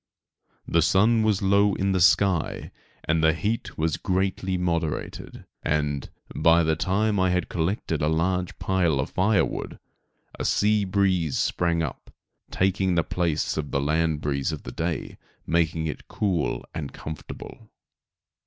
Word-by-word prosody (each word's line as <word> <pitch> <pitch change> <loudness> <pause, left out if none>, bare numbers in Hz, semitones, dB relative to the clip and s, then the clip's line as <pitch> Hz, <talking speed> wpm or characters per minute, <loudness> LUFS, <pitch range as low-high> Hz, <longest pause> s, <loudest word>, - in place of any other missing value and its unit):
The 85 - +3
sun 105 +7 +4
was 105 -3 +1
low 100 +1 +3
in 100 0 0
the 95 - +1
sky, 95 -1 +2 0.3
and 80 0 +1
the 80 0 +5
heat 100 -2 -3
was 80 -1 0
greatly 95 0 -1
moderated, 85 -3 -3 0.2
and, 75 -3 -1 0.3
by 85 0 +4
the 80 0 +2
time 100 +5 +1
I 95 0 +3
had 90 -1 0
collected 85 -2 -1
a 75 - +2
large 90 +3 0
pile 85 -7 +1
of 65 - -2
fire 95 +2 +3
wood, - - -6 0.6
a - - -2
sea 105 0 +2
breeze 95 -6 +1
sprang 85 -1 +1
up, 70 - -6 0.4
taking 95 -1 +1
the 85 - +3
place 85 -3 -1
of 75 -2 -3
the 70 - 0
land 80 +2 0
breeze 70 0 -1
of 75 - -6
the - - -7
day, 85 0 -4 0.3
making 80 -1 +1
it 75 - -5
cool 95 -7 -1
and 70 -3 -5
comfortable. 80 0 -9
85 Hz, 150 wpm, -25 LUFS, 80-95 Hz, 0.6 s, the